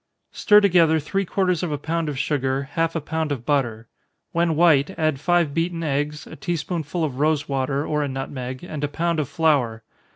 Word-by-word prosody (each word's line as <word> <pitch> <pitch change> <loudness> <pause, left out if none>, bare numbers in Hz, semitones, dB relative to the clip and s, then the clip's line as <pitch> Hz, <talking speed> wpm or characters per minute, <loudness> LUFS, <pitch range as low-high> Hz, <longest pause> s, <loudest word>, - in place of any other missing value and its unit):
_ - - -25
Stir 210 -1 +6
together 170 -5 +4
three 195 +7 -2
quarters 180 -2 0
of 175 - -2
a 145 - -1
pound 160 +2 -2
of 145 - -4
sugar, 135 -1 0
half 165 +1 0
a 165 - -1
pound 160 +1 -2
of 125 -4 -4
butter. 120 -6 0 0.4
When 170 -1 +1
white, 160 +1 +3
add 155 -4 0
five 170 -1 +2
beaten 165 +1 -1
eggs, 150 0 -2
a - - -10
tea 175 +5 -2
spoonful 165 +1 -3
of 140 -4 -3
rosewater, 145 -2 0
or 150 -1 0
a 145 - -1
nutmeg, 130 -1 -5
and 155 -4 -6
a - - +2
pound 165 +3 -1
of 145 - -2
flour. 130 -9 +1
150 Hz, 200 wpm, -23 LUFS, 140-165 Hz, 0.4 s, Stir